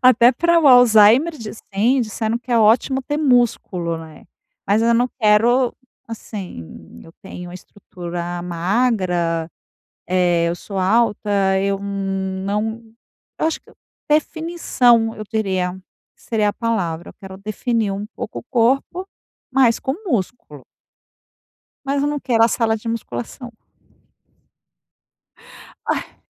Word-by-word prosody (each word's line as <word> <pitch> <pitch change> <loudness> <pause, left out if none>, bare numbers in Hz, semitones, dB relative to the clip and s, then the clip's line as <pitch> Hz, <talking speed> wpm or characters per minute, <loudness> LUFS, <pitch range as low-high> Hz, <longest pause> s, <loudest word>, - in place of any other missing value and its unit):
Até 250 -1 +6
para 340 +3 +2
o 290 - +5
Alzheimer 245 +5 +6
disse 220 -1 -8
sim, 245 +6 +3
disseram 220 +1 -2
que 245 0 -6
é 235 - +4
ótimo 230 +5 +3
ter 295 +3 -3
músculo, 235 - +1
né. 160 -1 -12 0.4
Mas 210 +3 +2
eu 235 0 +3
não 245 +2 +2
quero 235 +3 +3 0.3
assim, 185 - -9
eu 165 - -14
tenho 180 -2 -9
uma 175 - -10
estrutura 175 -2 -7
magra, 175 -3 0 0.8
eh, 170 -1 +2
eu 170 - -1
sou 195 +2 -8
alta, 200 -2 +2
eu 195 0 0
não 195 +2 -3 0.6
eu - - +1
acho 320 - -2
que - - -22
eu - - -20 0.3
definição, 295 -8 +2
eu 215 - -6
teria, 190 -5 -1 0.4
seria 215 -3 -1
a - - -4
palavra. 180 -9 -2
Eu - - -25
quero 190 -2 -11
definir 215 +1 -2
um 200 +2 -4
pouco - - -6
o - - -15
corpo, 270 +10 0 0.4
mas 255 -3 +3
com 265 - -2
músculo. 195 - -3 1.2
Mas 280 +1 0
eu 290 - +1
não 295 -1 -2
quero 230 -4 +2
a - - +6
sala 225 -1 +1
de 225 +2 -9
musculação. 230 - -5 2.3
Ai. - - -3
220 Hz, 130 wpm, -20 LUFS, 190-245 Hz, 2.3 s, Até